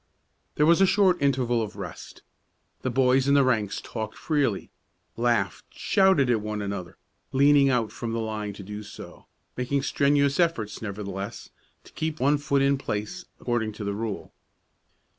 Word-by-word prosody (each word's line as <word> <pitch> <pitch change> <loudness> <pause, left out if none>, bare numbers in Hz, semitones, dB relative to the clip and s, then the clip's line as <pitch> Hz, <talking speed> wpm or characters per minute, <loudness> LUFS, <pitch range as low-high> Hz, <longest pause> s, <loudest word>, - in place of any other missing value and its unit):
There 150 - +3
was 170 +3 +5
a 195 - +6
short 185 -4 +3
interval 125 -4 +2
of 105 -2 -5
rest. 95 -5 -9 0.6
The 130 - -1
boys 130 +1 +3
in 140 - +4
the 140 - +6
ranks 110 -6 0
talked 110 -2 -6
freely, 140 - -1 0.4
laughed, 115 -4 0
shouted 190 -9 +3
at 120 -3 +2
one 105 0 -4
another, 100 -4 -5 0.3
leaning 140 +1 +5
out 120 -5 +1
from 115 +1 -5
the 115 - -2
line 110 -2 -3
to 100 - -10
do 105 +2 -7
so, 105 - -11 0.3
making 135 +2 -1
strenuous 140 +1 +2
efforts, 165 -12 0
nevertheless, 100 -1 -6 0.3
to - - -18
keep 155 0 -3
one 145 +3 +3
foot 140 -1 +1
in 140 0 +2
place, 120 - -4
according 110 -3 -1
to 105 - -7
the 100 0 -2
rule. 110 0 -5
120 Hz, 160 wpm, -26 LUFS, 105-140 Hz, 0.6 s, a